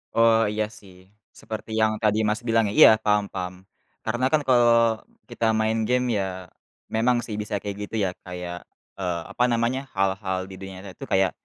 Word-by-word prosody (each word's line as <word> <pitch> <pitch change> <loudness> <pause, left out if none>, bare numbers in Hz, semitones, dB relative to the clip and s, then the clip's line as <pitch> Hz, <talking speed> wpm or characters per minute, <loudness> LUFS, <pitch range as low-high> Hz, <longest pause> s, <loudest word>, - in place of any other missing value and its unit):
Oh, 115 0 +5
iya 105 0 0
sih, 95 -3 -16 0.4
seperti 110 0 -7
yang 110 0 +3
tadi 105 0 +3
Mas 105 +3 0
bilang 115 -1 +3
ya? 100 - -3
Iya, - - +11
paham 105 -1 +3
paham. 90 -1 -4 0.5
Karena 120 +3 -1
kan 155 - +3
kalau 115 -2 +4 0.3
kita 120 -1 -2
main 110 +1 +1
game 125 0 +2
ya, 95 - 0 0.7
memang 120 +2 +3
sih 105 - -5
bisa 105 0 -4
kayak 100 -1 -4
gitu - - -7
ya 95 - +1 0.2
kayak, 90 -1 -6 0.4
eee, 90 -2 -1
apa 120 - 0
namanya, 120 +2 +1 0.2
hal-hal 95 -1 0
di 95 - -9
dunia 95 0 -8
nyata 100 - -8
itu - - -8
kayak, 95 0 +3
110 Hz, 185 wpm, -24 LUFS, 95-115 Hz, 0.7 s, Iya